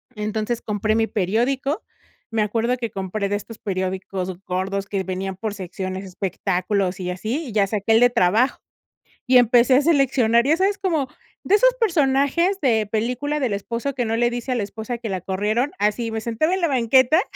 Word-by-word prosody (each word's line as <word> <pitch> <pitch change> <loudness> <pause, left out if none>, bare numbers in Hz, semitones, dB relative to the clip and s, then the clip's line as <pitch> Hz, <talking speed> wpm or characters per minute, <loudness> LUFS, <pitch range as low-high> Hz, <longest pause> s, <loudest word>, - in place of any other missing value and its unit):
Entonces, 215 +2 -2
compré 215 +1 -1
mi 225 0 +2
periódico, 245 - 0 0.5
me 225 -1 +1
acuerdo 230 +4 0
que 230 -3 -4
compré 195 0 -3
de 205 - 0
estos 210 +2 -7
periódicos 185 -1 -3
gordos 190 +2 -2
que 195 -2 -2
venían 190 +1 -4
por 215 +2 -4
secciones, 190 0 -5
espectáculos 190 0 -2
y 180 -1 -3
así, 220 - -3
y - - -7
ya 205 -2 +2
saqué 210 +2 0
el 225 - +6
de 245 +1 +6
trabajo. 225 +3 +2 0.7
Y 255 0 +7
empecé 245 +2 +5
a 280 - +4
seleccionar, 265 -6 +3
ya 310 +3 +4
sabes, 390 +3 +1
como 320 -8 0 0.4
de 410 - +4
esos - - +4
personajes 335 - +2
de 225 -6 +2
película 250 +7 -1
del 255 -6 0
esposo 235 +7 -3
que 245 -2 -1
no 225 0 -1
le 240 +1 +2
dice 240 +2 -4
a - - +2
la 235 - -1
esposa 220 +4 -5
que 230 - -5
la 190 -2 -3
corrieron, 210 - -1
así 210 +3 0
me 220 - -2
sentaba 235 +10 0
en 380 - -2
la 340 - +2
banqueta 260 +4 +4
225 Hz, 190 wpm, -22 LUFS, 200-260 Hz, 0.7 s, Y